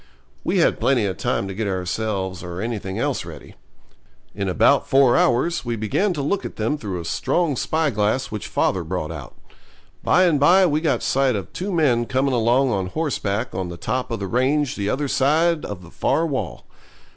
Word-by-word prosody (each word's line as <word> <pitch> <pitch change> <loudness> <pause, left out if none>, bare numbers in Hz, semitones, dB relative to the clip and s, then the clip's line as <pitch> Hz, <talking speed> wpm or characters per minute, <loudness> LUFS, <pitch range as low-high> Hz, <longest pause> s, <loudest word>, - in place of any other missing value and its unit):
We - - 0
had - - +3
plenty 125 -6 +2
of 95 -3 -3
time 100 - -1
to 95 - -5
get 105 +2 -3
ourselves 95 0 -2
or 90 0 -6
anything 105 -3 -4
else - - -1
ready. - - -11 0.8
In 100 -1 -2
about 140 +9 +3
four 135 -3 +5
hours 145 +8 +2
we 120 -2 -2
began 110 - 0
to 145 -4 -3
look 195 +7 -1
at - - -6
them 110 +7 -1
through 100 -10 -5
a 85 - -7
strong 165 - 0
spyglass 130 -5 0
which 105 -1 -5
father 95 - 0
brought 85 -1 -3
out. 75 -6 -9 0.7
By 185 - +4
and 165 -5 +3
by 180 +7 +6
we 155 -2 +1
got 160 -3 0
sight 135 -2 +2
of 95 -5 -5
two 195 +3 -4
men 130 -9 +2
coming 135 +1 +1
along 120 +3 +2
on 95 -3 -1
horseback 110 - -2
on 90 -1 -3
the 85 - -7
top 125 +8 -2
of 115 - -3
the 100 - -3
range 130 +7 +1
the 100 0 -2
other 145 +5 -1
side 155 +5 +2
of 95 -3 -7
the 85 - -14
far 165 - +1
wall. 130 - -4
120 Hz, 195 wpm, -22 LUFS, 95-145 Hz, 0.8 s, by